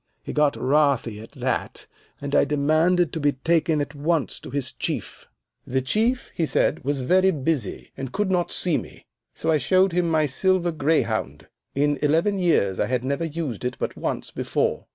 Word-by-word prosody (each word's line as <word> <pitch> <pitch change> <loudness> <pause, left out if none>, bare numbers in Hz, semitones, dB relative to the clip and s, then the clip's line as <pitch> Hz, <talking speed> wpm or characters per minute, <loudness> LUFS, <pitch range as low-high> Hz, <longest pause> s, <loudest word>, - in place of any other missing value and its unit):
He - - -6
got 150 -1 +2
wrathy 135 -5 +1
at 110 - -13
that, - - -3 0.3
and 140 0 -5
I - - +5
demanded 155 +4 +2
to 160 - -2
be 145 -1 +2
taken 160 +3 +1
at 145 +1 -4
once 150 +1 -1
to - - -10
his 135 -1 -2
Chief. - - -5 0.4
The 130 +1 0
Chief, 225 - 0
he 165 - 0
said, - - +1
was 140 0 -1
very 185 +8 +4
busy, 150 - -2
and 135 -2 -6
could 205 -1 -1
not 175 -2 +1
see 175 -4 +1
me. - - -12 0.3
So 160 - 0
I 155 - +4
showed 185 +8 +3
him 175 0 +1
my 155 -1 +3
silver 175 +5 +1
greyhound. 115 - -1 0.3
In 145 0 +1
eleven 165 +7 +2
years 100 - +2
I - - +1
had 125 -1 -1
never 140 +5 -1
used 155 -8 -4
it 125 +1 -2
but - - -3
once - - -3
before. - - -1
150 Hz, 185 wpm, -24 LUFS, 135-170 Hz, 0.4 s, I